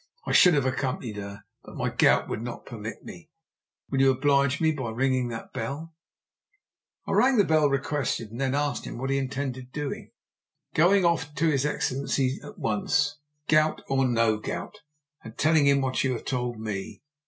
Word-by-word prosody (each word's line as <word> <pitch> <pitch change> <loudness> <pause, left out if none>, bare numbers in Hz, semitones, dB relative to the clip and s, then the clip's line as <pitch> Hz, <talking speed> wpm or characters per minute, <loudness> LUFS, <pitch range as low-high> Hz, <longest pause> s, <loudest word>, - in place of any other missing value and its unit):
I - - -2
should 180 -3 +6
have 140 -3 +1
accompanied 130 -4 -2
her, 100 0 -7 0.2
but - - -12
my - - -1
gout - - +3
would - - -4
not 120 0 -7
permit 110 -3 -7
me. 170 -2 -11 0.6
Will 135 -1 +2
you 135 - +6
oblige 140 +1 +2
me 160 -1 +3
by 130 -6 -4
ringing 130 +2 0
that 115 -1 -7
bell?" 145 +8 -5 1.1
I - - -4
rang 260 -1 +4
the 205 - +6
bell 155 -3 +3
as - - +4
requested, 140 -5 -2
and 120 +4 -6
then 135 0 0
asked 145 0 -2
what 135 +3 -3
he 135 - +2
intended 130 -1 -4
doing. 145 -1 -5 0.6
"Going 180 +4 +4
off 160 -3 0
to 160 +2 +2
his 140 0 +1
Excellency 135 -1 -1
at 210 - -11
once, 145 - 0 0.3
gout 155 0 +2
or 135 -1 +2
no 115 -3 +2
gout, - - -6 0.4
and 115 -1 -11
telling 155 -2 +4
him 140 0 +4
what 130 0 0
you 135 -1 +1
have 120 - -6
told 125 -4 -2
me. 105 0 -5
135 Hz, 180 wpm, -26 LUFS, 120-150 Hz, 1.1 s, should